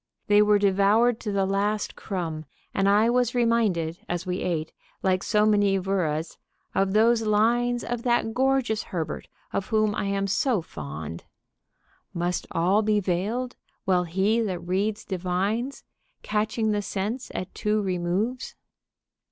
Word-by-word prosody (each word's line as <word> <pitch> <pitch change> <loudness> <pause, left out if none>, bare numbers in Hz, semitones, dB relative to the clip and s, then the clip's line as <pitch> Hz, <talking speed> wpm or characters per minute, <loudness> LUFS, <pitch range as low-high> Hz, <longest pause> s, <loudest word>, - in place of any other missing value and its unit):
They 205 0 +5
were 210 0 +5
devoured 205 +4 +3
to 210 - -4
the 195 -1 +1
last 205 +2 -1
crumb, 165 -5 -4 0.3
and 195 0 +2
I 210 +3 +4
was 250 0 +1
reminded 215 -9 +1
as 175 +1 -2
we 180 0 -2
ate, 160 -3 -2 0.3
like 185 -1 +2
so 210 0 +2
many 205 -2 +3
wurras, 175 -5 -1 0.4
of 195 0 +1
those 225 +2 +4
lines 235 +3 +2
of 240 -1 -3
that 240 -2 +1
gorgeous 260 -3 +1
Herbert, 165 -5 -4 0.3
of 195 - -1
whom 215 -2 +2
I 205 - -2
am 195 0 0
so 200 - +1
fond: 75 - -7 0.9
"Must 175 +1 -1
all 185 +6 +2
be 210 -1 +2
veiled, 205 +7 -2 0.3
while 180 -2 +2
he 195 +7 +1
that 195 -5 -1
reads 205 +4 -1
divines, 195 +8 -2 0.4
_Catching 215 +1 0
the 205 0 0
sense 210 +6 -3
at 185 - -4
two 215 0 0
removes?" 190 +6 -2
205 Hz, 145 wpm, -26 LUFS, 185-220 Hz, 0.9 s, They